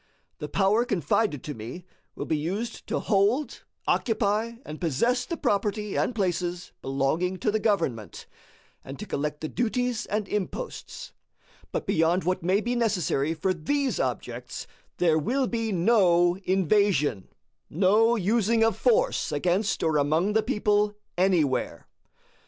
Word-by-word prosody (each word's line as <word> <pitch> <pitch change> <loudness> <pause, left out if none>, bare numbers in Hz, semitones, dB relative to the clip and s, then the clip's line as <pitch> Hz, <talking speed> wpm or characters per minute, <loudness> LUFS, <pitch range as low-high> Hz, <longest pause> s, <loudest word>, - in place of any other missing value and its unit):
The 150 - -5
power 205 +4 +3
confided 180 - 0
to 150 - -5
me 125 +10 -8 0.3
will - - -4
be 160 - 0
used 190 +10 -4
to - - -1
hold, 220 +8 +1 0.3
occupy, 220 0 +1
and 155 +3 -8
possess 235 - +1
the 335 - -3
property 205 -1 -1
and 245 - 0
places 180 -3 -2
belonging 140 +8 0
to 210 - 0
the 220 - 0
government, 165 - -1 0.6
and 135 - -8
to 215 - -6
collect 150 -4 -3
the 155 - -2
duties 245 +3 -1
and 210 0 -2
imposts; 210 - -5 0.6
but - - -3
beyond 165 +3 +2
what 185 +1 0
may 185 +5 +2
be 240 +2 -1
necessary 175 - 0
for 185 +4 0
these 270 - -1
objects, - - -4 0.3
there 160 -3 +3
will 260 - 0
be 230 -2 -2
no 175 -3 +4
invasion, 185 - +2 0.4
no 210 +7 +3
using 225 +2 +2
of 225 -3 +2
force - - +2
against 185 +4 0
or 160 -2 +2
among 160 +8 +1
the 220 - +3
people 210 -2 +1 0.2
anywhere. 170 -8 +1
195 Hz, 140 wpm, -26 LUFS, 165-225 Hz, 0.6 s, no